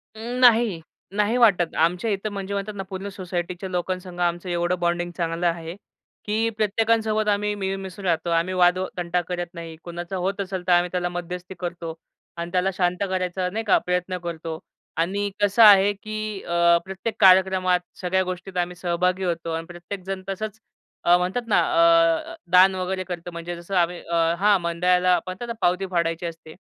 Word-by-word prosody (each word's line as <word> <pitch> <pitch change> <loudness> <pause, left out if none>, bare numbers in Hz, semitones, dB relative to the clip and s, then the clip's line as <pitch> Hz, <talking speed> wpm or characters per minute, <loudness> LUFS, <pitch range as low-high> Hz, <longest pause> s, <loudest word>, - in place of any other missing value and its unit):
अं, 240 +3 -5
नाही, 230 -8 +5 0.3
नाही 210 +4 +2
वाटत. 190 -8 +3
आमच्या 180 +7 +1
इथं 200 +2 -2
म्हणजे 200 0 -4
म्हणतात 200 +1 -3
ना, 195 - -4
पूर्ण 190 +1 -5
सोसायटीच्या 180 -1 -5
लोकांसंग 180 0 -4
आमचं 175 +1 -1
एवढं 175 +1 0
बॉन्डिंग 175 0 -1
चांगलं 170 0 -2
आहे. 165 0 -3 0.5
की 220 +2 +1
प्रत्येकांसोबत 220 0 +1
आम्ही 210 0 +1
मिळून-मिसळून 195 -1 -5
राहतो. 165 0 0
आम्ही 170 +2 +1
वाद 180 0 +4 0.2
तंटा 175 0 0
करत 175 -1 -4
नाही, 165 -1 -8
कुणाचा 175 +2 -6
होत 200 +1 -1
असेल 190 -2 -4
तर - - +3
आम्ही 175 0 +4
त्याला 175 -1 -1
मध्यस्थी 180 +1 -6
करतो 170 -2 -5 0.4
आणि 170 +1 -5
त्याला 185 +1 +1
शांत 180 -1 0
करायचा 185 0 -1
नाही 220 +4 -3
का, - - +6
प्रयत्न 180 +1 -2
करतो. 165 -1 -5 0.4
आणि 200 +5 0
कसं 205 +3 +5
आहे, 205 -1 +8
की 215 0 -5
अ, 170 0 +4
प्रत्येक 190 +3 -4
कार्यक्रमात 185 -1 +5 0.2
सगळ्या 190 +1 +1
गोष्टीत 185 0 -6
आम्ही 175 0 -1
सहभागी 180 +2 0
होतो 170 -2 -2
आणि 165 0 -3
प्रत्येकजण 185 +2 -7
तसंच, 215 +2 -4 0.4
अ, 175 +1 +6
म्हणतात 190 +7 -2
ना 205 - +4
अ, 165 - +3 0.2
दान 185 +1 +6
वगैरे 185 0 -2
करतो, 175 -1 -6
म्हणजे 170 +1 -6
जसं 170 +3 -6
आम्ही 175 0 +1
अ, 170 - -4 0.2
हां, 205 -1 +4
मंडळाला 180 +1 +2
म्हणतात 185 +6 -6
ना, 235 - -3
पावती 180 +2 +2
फाडायची 170 0 0
असते. 165 -1 -8
180 Hz, 170 wpm, -24 LUFS, 175-195 Hz, 0.5 s, आहे